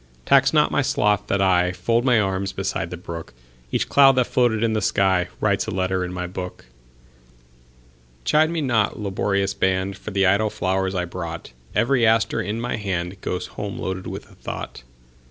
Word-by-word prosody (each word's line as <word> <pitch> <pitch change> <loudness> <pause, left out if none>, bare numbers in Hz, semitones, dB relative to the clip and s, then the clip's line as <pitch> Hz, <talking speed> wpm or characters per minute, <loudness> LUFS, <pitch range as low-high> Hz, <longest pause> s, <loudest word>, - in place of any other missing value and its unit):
Tax 140 0 +5
not 150 -1 +3
my - - +2
sloth 105 -7 +1
that 100 0 +1
IFold 95 +5 +2
my 125 -3 +4
arms 95 -1 -1
beside - - -3
the - - -6
brook; 85 -7 -8 0.4
Each - - 0
cloud 135 -1 +6
that 125 -1 +2
floated 120 -3 +1
in 115 -1 +1
the 110 - +1
skyWrites 95 -3 +1
a - - -2
letter 95 0 0
in 90 - -4
my 90 0 -4
book. 90 -5 -7 1.6
Chide 155 +1 +4
me 165 -1 -2
not, 115 -8 +1
laborious 100 -1 -1
band, 95 +1 0
For 105 - -8
the 95 -1 +1
idle 100 +3 +3
flowers 95 0 -1
I 90 -1 0
brought; 85 -4 -6 0.2
Every 120 +3 +2
aster 110 0 +3
in 105 +1 -3
my 120 0 -2
handGoes 90 -2 -3
home 100 -1 -6
loaded 95 0 -4
with - - -7
a - - -19
thought. - - -7
100 Hz, 175 wpm, -22 LUFS, 95-115 Hz, 1.6 s, cloud